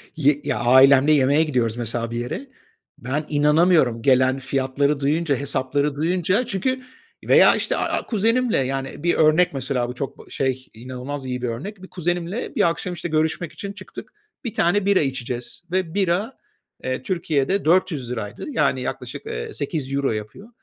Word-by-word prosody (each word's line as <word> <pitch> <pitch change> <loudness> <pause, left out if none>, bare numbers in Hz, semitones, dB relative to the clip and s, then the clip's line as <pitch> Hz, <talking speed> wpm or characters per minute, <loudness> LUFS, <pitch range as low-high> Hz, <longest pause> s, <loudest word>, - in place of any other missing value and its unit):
y 145 -1 +2
ya 145 -2 -1
ailemde 130 +4 +6
yemeğe 145 +1 +4
gidiyoruz 120 -7 0
mesela 115 0 -3
bir 120 - -3
yere. 185 - -5 0.5
Ben 140 +5 -3
inanamıyorum 150 -4 +3
gelen 130 +1 +3
fiyatları 140 +2 0
duyunca, 145 +2 +1
hesapları 140 +1 -1
duyunca. 180 - +1
Çünkü 255 +7 -1 0.4
veya, - - +6
işte, - - -1
a - - 0 0.2
a - - -10
kuzenimle, 230 +2 +1
yani, 135 +2 -3
bir 175 - +2
örnek 155 +2 +4
mesela 130 -3 -1
bu 125 - -6
çok 135 +1 -6
şey, 130 -1 -2
inanılmaz 130 +4 -7
iyi 125 -1 -3
bir 125 - -1
örnek. 190 - -6
Bir 190 - -10
kuzenimle 175 +4 -3
bir 170 - +4
akşam, 180 +2 -4
işte, 175 0 -5
görüşmek 160 +1 -1
için 200 0 -7
çıktık. 190 -2 -10 0.3
1 230 - -3
tane 185 +4 +2
bira 200 -1 +4
içeceğiz 130 -1 -4
ve 185 -3 -1
bira, 200 +5 0 0.5
eee, 130 0 -2
Türkiye'de 170 +1 0
₺400'ydı, 135 - 0
yani 140 - +1
yaklaşık, - - -6
eee, - - -5
€8 140 -2 -2
yapıyor. 110 - -6
145 Hz, 155 wpm, -22 LUFS, 130-175 Hz, 0.5 s, ailemde